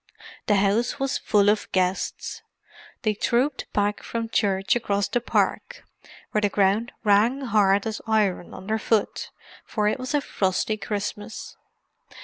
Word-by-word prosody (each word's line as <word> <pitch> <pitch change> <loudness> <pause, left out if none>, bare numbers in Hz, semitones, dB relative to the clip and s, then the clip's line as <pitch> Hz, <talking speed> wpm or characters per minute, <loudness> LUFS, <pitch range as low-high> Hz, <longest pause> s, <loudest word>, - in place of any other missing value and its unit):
The 210 - +4
house 205 +7 +1
was 270 0 0
full 205 -1 +3
of 210 0 +1
guests; 185 0 -1 0.6
they 215 -2 +2
trooped 250 +6 0
back 205 0 0
from 230 -1 -4
church 195 -3 +1
across 205 -4 0
the 245 - -1
park, - - -1 0.5
where 210 - +1
the 205 - +2
ground 200 +4 +2
rang 220 +6 +3
hard 205 -5 +3
as 220 -1 -3
iron 210 -5 +1
underfoot, 215 +1 -1 0.3
for 210 -2 -1
it 215 - 0
was 255 +3 -2
a 290 - +2
frosty 190 -1 0
Christmas. 210 +1 -5
210 Hz, 135 wpm, -25 LUFS, 200-230 Hz, 0.6 s, The